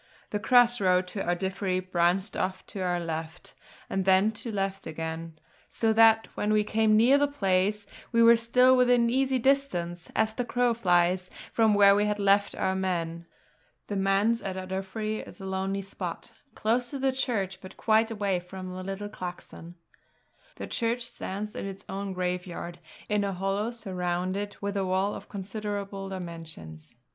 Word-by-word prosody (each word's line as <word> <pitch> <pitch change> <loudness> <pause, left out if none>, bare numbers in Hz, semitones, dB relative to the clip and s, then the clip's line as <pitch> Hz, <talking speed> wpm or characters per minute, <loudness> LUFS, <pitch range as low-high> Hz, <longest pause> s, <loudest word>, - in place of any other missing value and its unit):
The 210 - -1
cross 245 +1 +4
road 185 -1 +3
to 195 +1 -4
Ardiffery 190 +1 -1
branched 185 +2 +1
off 185 0 -2
to 200 - -7
our 180 -1 0
left, 165 0 -5 0.3
and 195 - -1
then 190 +3 +4
to 220 +2 -6
the 215 - -5
left 195 -1 -2
again; 160 0 -5 0.3
so 225 -1 +1
that 225 0 +5
when 210 - -1
we 215 0 +3
came 215 0 +3
near 255 +6 +5
the 290 - +3
place, 200 -5 0 0.3
we 230 -1 +4
were 230 0 +8
still 250 +3 +4
within 245 -2 +4
easy 265 +1 +2
distance, 190 -11 0
as 220 0 +2
the 245 - -2
crow 245 0 +1
flies, 180 -3 +2 0.2
from 220 -2 +4
where 200 -1 +7
we 205 +1 +2
had 210 0 0
left 200 0 +3
our 190 - 0
men. 170 -3 -2 0.6
The 205 - -2
Manse 195 +4 +2
at 190 -1 -4
Ardiffery 190 +3 -3
is - - -13
a 195 - -7
lonely 190 +1 -2
spot, 195 - -6 0.2
close 240 +3 0
to 280 - -4
the 270 0 +1
church, 200 -8 -2
but 185 - -11
quite 220 0 +3
away 200 -4 -1
from 185 +1 -8
the 185 0 -6
little 195 +2 -4
clachan. 175 -3 -8 0.8
The - - -6
church 235 0 -1
stands 210 +1 -5
in - - -4
its 195 +1 -8
own 195 0 -4
graveyard, 180 -1 -4 0.3
in 210 -1 +1
a 200 -1 -1
hollow 195 +4 -1
surrounded 185 -2 -3
with 200 0 -3
a 195 - 0
wall 190 +2 0
of - - -9
considerable 200 -1 -5
dimensions. 165 - -8
195 Hz, 170 wpm, -28 LUFS, 185-220 Hz, 0.8 s, were